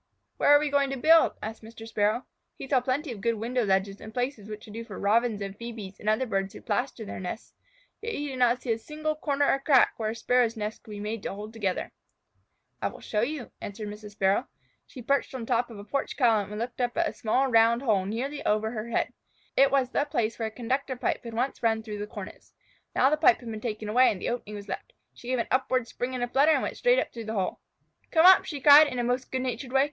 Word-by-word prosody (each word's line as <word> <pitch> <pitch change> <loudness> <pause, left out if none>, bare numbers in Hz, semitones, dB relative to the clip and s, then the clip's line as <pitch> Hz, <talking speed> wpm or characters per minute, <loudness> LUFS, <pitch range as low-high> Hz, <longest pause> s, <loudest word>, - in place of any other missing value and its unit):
"Where - - +2
are 290 - +9
we 295 0 -1
going 280 -1 +2
to 270 - -3
build?" 320 +5 +5
asked 220 +1 -6
Mr. 225 0 -11
Sparrow. 215 +2 0 0.3
He - - -8
saw 265 -2 +3
plenty 260 +3 -1
of 210 -4 -8
good 230 +1 +1
window 240 +3 -1
ledges 195 0 0
and 220 - -9
places 245 -3 -3
which 210 0 -8
would 210 - -12
do 230 +1 -5
for 215 -4 -9
Robins 215 0 +1
and 195 0 -6
Phœbes 220 -4 -8
and 210 - -1
other 215 +5 +2
birds 195 -3 -2
who - - -9
plaster 245 -3 -2
their - - -6
nests. 185 +4 -6 0.5
Yet 455 +1 -4
he 290 0 -3
did 260 -1 -6
not 245 0 +3
see 245 - -1
a 225 - -5
single 310 +5 -3
corner 285 -2 0
or 275 - +2
big 275 - -25
crack 270 -5 +5
where 220 -1 -1
a 220 - -4
Sparrow's 235 0 +1
nest 215 0 -4
could - - -17
be 205 -1 -7
made 210 +1 -4
to 195 - -4
hold 210 +2 -8
together. 200 -5 -2 0.9
"I - - +1
will - - -8
show 210 - -2
you," 270 0 -3
answered 205 +1 -6
Mrs. 210 0 -9
Sparrow. 195 +5 +1 0.4
She 255 - -10
perched 275 +1 0
on 255 - -4
the - - -5
top 240 +1 +1
of 225 - -10
a 200 - -8
porch 275 +7 -3
column 220 -6 +3
and 210 - -5
looked 245 +2 -4
up 245 +3 -1
at 340 -1 +2
a - - -4
small 255 +2 +1
round 230 +2 +4
hole 205 -7 +2
nearly 265 +7 -3
over 215 +1 +1
her 225 0 -5
head. - - -1 0.4
It 275 0 +6
was 265 -2 +1
the 290 - +1
place 240 -7 -1
where 225 - -1
a - - -7
conductor 260 +4 -2
pipe 245 - -2
had 230 -1 -7
once 255 +4 -1
run 225 -1 +1
through 210 -2 -6
the 205 - -4
cornice. - - -10 0.4
Now 265 - +4
the 305 - +2
pipe 345 +4 +5
had 235 -2 -7
been 215 -1 -6
taken 215 -2 -4
away 250 +5 +5
and 195 - -5
the - - -2
opening 230 -3 -4
was 205 0 -8
left. 190 - -6 0.2
She 240 - -13
gave 255 0 0
an 235 - -1
upward 260 -2 +1
spring 250 +2 -4
and 245 -1 -3
flutter 290 +4 +5
and - - +1
went - - -3
straight - - +4
up - - -1
through 230 -2 -7
the 220 +1 -4
hole. 190 -2 -1 0.5
"Come 325 0 +4
up!" 375 0 +8
she 290 - -5
cried 295 +2 +9
in 255 -3 -5
the 240 - 0
most 245 +2 -1
good 260 0 -1
natured 250 0 -4
way. 265 - +3
235 Hz, 265 wpm, -27 LUFS, 215-265 Hz, 0.9 s, are